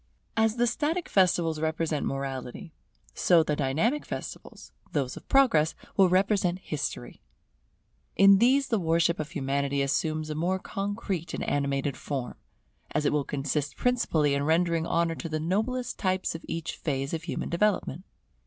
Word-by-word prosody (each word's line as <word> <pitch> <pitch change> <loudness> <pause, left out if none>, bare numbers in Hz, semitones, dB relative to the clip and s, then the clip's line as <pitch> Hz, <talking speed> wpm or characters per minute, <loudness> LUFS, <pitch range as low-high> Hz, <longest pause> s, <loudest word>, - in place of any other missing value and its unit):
As 220 0 +2
the 240 0 +2
static 305 +8 -1
festivals 175 -4 +2
represent 160 -1 -1
Morality, 135 - -5 0.4
so 170 -2 +4
the 150 -1 -1
dynamic 155 - 0
festivals, - - -8 0.2
those 135 -4 -1
of - - -12
Progress, 230 - +4 0.2
will 190 -2 +5
represent 185 -1 +2
History. 140 - -5 0.9
In 195 0 +7
these 265 +3 +3
the 225 - +2
worship 170 0 +2
of 155 - -3
Humanity 140 0 -1
assumes 155 +2 -1
a - - -1
more 175 +5 0
concrete 195 -3 -4
and - - -4
animated 140 -1 -1
form; 130 -5 -4 0.6
as 150 +1 -1
it - - +2
will 150 -1 +1
consist 145 +1 -2
principally 165 -13 +1
in 140 - 0
rendering 165 +2 +1
honour 170 0 +1
to 165 +1 -6
the 155 0 -2
noblest 220 +9 -1
types 185 -1 0
of 165 - -8
each 165 0 -4
phase 135 -2 -2
of 165 0 -3
human - - -3
development. 185 -3 0
165 Hz, 155 wpm, -28 LUFS, 145-195 Hz, 0.9 s, In